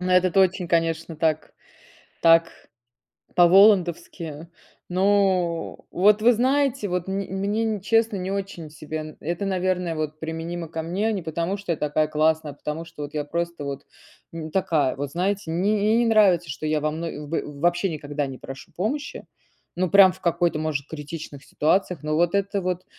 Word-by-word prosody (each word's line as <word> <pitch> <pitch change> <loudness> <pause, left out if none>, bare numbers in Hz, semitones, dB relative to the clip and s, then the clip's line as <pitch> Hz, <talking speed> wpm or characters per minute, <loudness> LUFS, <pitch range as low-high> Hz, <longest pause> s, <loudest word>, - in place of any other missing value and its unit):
Ну, 185 0 -2
это 185 +1 +4
очень, 185 -1 +1
конечно, 165 -1 0
так 155 -1 0 0.7
так 165 0 +6 0.9
по-волландовски. 175 -4 +3 0.4
Ну 185 -3 +1
вот, 205 +3 +4
вы 240 +2 +6
знаете, 260 -2 +1
вот 180 0 -2
мн 195 +1 -1
мне, 200 +3 -1
н 215 -3 -2
честно, 225 0 +2
не 185 +1 -4
очень 195 -5 -5
себе. 155 +1 -7
Э 155 0 -8
это, 170 +5 -3
наверное, 180 -3 -1
вот 155 0 -4
применимо 165 +1 -5
ко 160 0 -4
мне. 200 +7 -1
Не 195 - -3
потому, 170 +5 -2
что 195 -3 -4
я - - -6
такая 150 +1 0
классная, 155 0 +1
а - - -19
потому 150 +3 -5
что 165 -3 -9
вот 145 - -8
я 150 -1 -2
просто 170 -1 -3
вот, 140 0 -6 0.5
м, 160 -1 -6
такая. 155 -8 +1
Вот, 140 0 -4
знаете, 185 -1 -1
мне 190 +6 +1
н - - +2
мне 215 +3 +3
не 240 - +3
нравится, 190 -7 +4
что 150 +2 -5
я 155 0 +1
вам 155 +1 -2
ну 150 -3 -5
в - - -13
в 145 -1 -10
вообще 175 +2 +2
никогда 145 -2 -3
не 130 -1 -7
прошу 135 0 -10
помощи. 275 +10 -3 0.5
Ну, 180 0 0
прям 195 -2 +8
в 185 - -15
какой-то, 170 -1 +1
может, 155 -2 -2
критичных 150 -2 -8
ситуациях. 175 0 0
Но 155 0 -1
вот 175 +2 +2
это 200 0 0
вот 180 0 -3
170 Hz, 185 wpm, -24 LUFS, 155-195 Hz, 0.9 s, прям